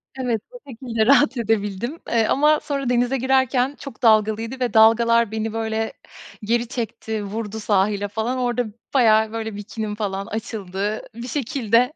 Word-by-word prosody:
Evet, 245 -5 -1
o - - -10
şekilde 230 -3 -2
rahat 260 0 +4
edebildim, 225 - -1
eee, 225 -2 +2
ama 300 +2 +3
sonra 275 -3 -2
denize 245 +2 +1
girerken 260 +1 +1
çok 275 -6 -10
dalgalıydı 220 +2 +2
ve 250 -2 -1
dalgalar 230 0 +5
beni, 220 0 -3
böyle, 225 0 -2 0.5
geri 235 +3 0
çekti 220 -3 -4
vurdu 215 +1 -5
sahile 205 -1 +1
falan 220 +5 -2
orada 245 -1 0 0.3
bayağı, 220 -4 +4
böyle, 220 -2 -4
bikinim 210 +1 -5
falan 200 -2 -3
açıldı. 210 -1 -4
Bir 235 +1 -7
şekilde 250 -1 +1
225 Hz, 145 wpm, -22 LUFS, 215-250 Hz, 0.5 s, dalgalar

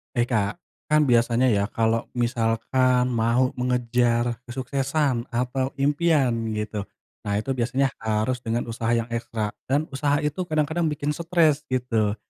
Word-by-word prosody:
Hai, 120 - +3
Kak. 110 -5 0 0.3
Kan 150 0 +4
biasanya 120 -1 +3
ya 100 -1 +1
kalau 115 0 0
misalkan 125 +2 +1
mau 120 +2 +2
mengejar 120 -1 +1
kesuksesan 135 0 -1
atau 125 +2 -2
impian 145 -1 +2 0.2
gitu, 105 -1 -4 0.3
nah 100 -1 -2
itu 110 +6 -2
biasanya 130 +3 +1
harus 110 +3 -1
dengan 120 0 -2
usaha 115 0 -4
yang 115 0 -1
ekstra 115 -2 -3 0.2
dan 145 +4 0
usaha 145 +2 0
itu 150 +3 -2
kadang-kadang 160 +2 0
bikin 150 -1 -1
stres 160 -2 +1
gitu. 115 -5 0
125 Hz, 135 wpm, -24 LUFS, 115-140 Hz, 0.3 s, Kan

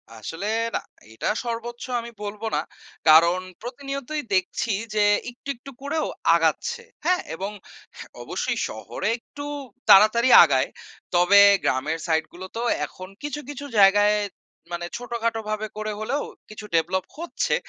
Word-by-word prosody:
আসলে 165 - -6 0.3
না, - - +1 0.3
এটা 110 - -4 0.2
সর্বোচ্চ 235 0 -5 0.2
আমি 235 - -9
বলব 205 +1 -6
না, - - +1 0.5
কারণ 170 +3 +7 0.2
প্রতিনিয়তই 275 +4 -5
দেখছি 185 +4 0 0.2
যে 210 - +4 0.3
একটু, 245 +3 -11
একটু 275 +3 -12
করেও 305 +3 -1 0.3
আগাচ্ছে, 475 0 0 0.2
হ্যাঁ? 365 0 +3
এবং 195 +4 -4 0.4
হ্যাঁ - - -10
অবশ্যই - - -2
শহরে - - -5
একটু 285 +4 -10 0.5
তাড়াতাড়ি 225 +5 +7
আগায়। - - +2 0.5
তবে 180 +3 +6 0.2
গ্রামের 150 +5 0
সাইড 160 -1 +2
গুলো 185 +2 -8
তো 230 - -2 0.2
এখন 185 +4 -10 0.2
কিছু, 295 0 -3
কিছু 285 0 -6
জায়গায় 205 +2 +6 0.6
মানে 175 0 -3
ছোটখাটো 235 -1 -2
ভাবে 215 0 -2
করে 215 0 -3
হলেও, 275 +7 -1 0.3
কিছু 215 0 -9
develop 180 +3 +1
হচ্ছে। 340 - -1
215 Hz, 135 wpm, -24 LUFS, 185-250 Hz, 0.6 s, কারণ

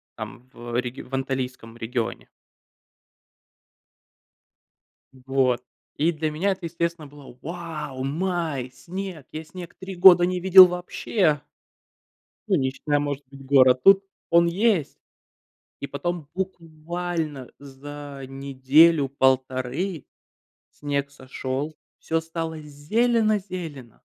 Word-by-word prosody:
Там, 125 +2 -9
в 120 0 -7
реги 125 0 -5
в 125 - -15
Анталийском 130 -3 -4
регионе. 115 0 -4 2.8
Вот. 130 -1 0 0.3
И 160 +3 +2
для 155 -1 -2
меня 185 +7 0
это, 185 -2 -5
естественно, 170 -2 -3
было: 140 -3 -14
вау, 155 -5 -6
май, 155 -4 -2
снег! 170 +2 -7
Я 155 +1 -6
снег 175 +2 -10
три 190 0 -7
года 175 -1 +8
не 180 0 -1
видел 185 +1 +10
вообще! 180 -3 0 1.1
Ну, 195 - +3
не 130 -3 +1
считая, 145 +2 -1
может 145 -1 -3
быть, 135 -1 -13
гор. 130 -2 +6
А - - +7
тут 195 +9 +5 0.3
он 170 0 +5
есть! 190 - +1 0.8
И 140 - -5
потом 155 +1 -4
буквально 165 -5 -4
за 140 0 -9
неделю-полторы 135 +2 +2 0.7
снег 140 -1 -3
сошёл, 135 +2 -5 0.2
всё 165 0 -1
стало 165 -1 -5
зелено-зелено. 180 - -1
150 Hz, 105 wpm, -24 LUFS, 135-175 Hz, 2.8 s, видел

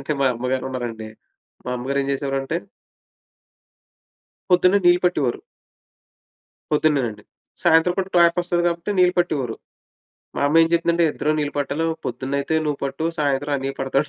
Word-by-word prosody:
చెప్పాలంటే 140 +3 -3
మా 135 - +3
అమ్మగారున్నారండి, 125 -3 -3 0.6
మా 125 - -4
అమ్మగారేం 135 +2 -2
జేసేవారంటే 135 +2 -2 2.0
పొద్దున్నే 180 +2 +5
నీళ్ళు 175 0 +5
పట్టేవారు. 145 -9 0 1.3
పొద్దున్నేనండి. 135 -9 +1 0.4
సాయంత్రం 170 +1 +4
కూడా 190 0 -1
టాప్ 170 0 +5
వస్తది 175 0 0
గాబట్టి 170 +3 -2
నీళ్ళు 180 0 +4
పట్టేవోరు. 140 -9 -1 0.8
మా - - -2
అమ్మేం 165 +2 +5
చెప్పిందంటే, 170 0 +2
"ఇద్దరూ 150 - -1
నీళ్ళు 145 -1 -2
పట్టలో, 145 +3 -1 0.2
పొద్దున్నయితే 140 +4 -2
నువ్వు 145 -2 -1
పట్టు, 140 +3 -3 0.2
సాయంత్రం 145 0 0
అన్నీయ 135 0 -3
పడతాడు." 135 +2 0
145 Hz, 125 wpm, -22 LUFS, 135-170 Hz, 2.0 s, పొద్దున్నే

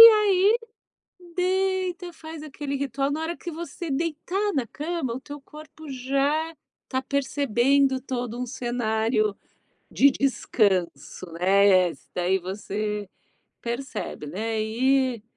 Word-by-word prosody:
E - - +15
aí 425 -1 +5 0.8
deita, 370 -1 0
faz 320 -1 -9
aquele 285 -1 -4
ritual. 275 0 -1
Na 300 - -1
hora 330 +2 -2
que 345 - -6
você 340 0 -5
deitar 335 +7 -1
na 265 -4 0
cama, 305 -3 -3
o - - -4
teu 290 +1 -9
corpo 305 +1 -12
já 275 +5 0 0.3
está 260 0 -1
percebendo 270 -1 +2
todo 245 -3 -3
um 250 - -1
cenário 225 -3 0 0.6
de 280 - +6
descanso, 190 - 0
né? 185 0 +5 0.2
Daí 180 +2 +2
você 205 +2 -3 0.5
percebe, 235 - -4
né? 220 +7 -2
E 255 +1 +2
270 Hz, 115 wpm, -26 LUFS, 220-315 Hz, 0.8 s, E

